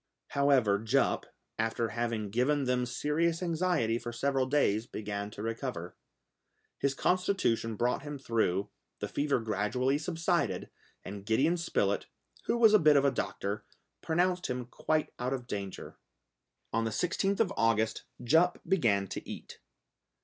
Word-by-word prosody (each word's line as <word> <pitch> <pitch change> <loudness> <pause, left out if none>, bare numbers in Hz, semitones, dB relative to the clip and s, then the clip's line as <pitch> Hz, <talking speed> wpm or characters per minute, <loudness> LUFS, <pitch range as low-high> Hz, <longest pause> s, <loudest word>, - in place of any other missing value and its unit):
However 135 -8 +3
Jup, 115 +6 +1 0.3
after 115 +1 0
having 115 -3 -2
given 135 +6 +2
them 125 -1 +1
serious 165 +7 0
anxiety 165 -9 +1
for 120 0 -5
several 135 +2 0
days, 120 -6 +2
began 105 -1 -4
to 105 0 -8
recover. 115 -6 -4 0.8
His 140 -1 +1
constitution 180 - +1
brought 120 +3 0
him 145 0 -6
through, 105 -6 0 0.3
the - - -4
fever 145 -2 0
gradually 115 +6 0
subsided, 165 +1 -1 0.3
and 100 +1 -7
Gideon 130 - +2
Spilett, 100 - 0 0.4
who - - +1
was 225 -2 +6
a 215 - +8
bit 150 -3 +6
of 140 - +3
a 140 - +4
doctor, 100 -5 -3 0.4
pronounced 180 +2 +1
him 125 -1 -3
quite 155 +5 -1
out 125 +2 -1
of 125 -2 -4
danger. 100 -4 -6 0.7
On 115 +1 +1
the 115 - 0
16th 185 - 0
of 200 -4 +2
August, 110 -1 +1 0.2
Jup 165 +8 +3
began 115 - +2
to - - -7
eat. - - -8
125 Hz, 140 wpm, -31 LUFS, 110-155 Hz, 0.8 s, a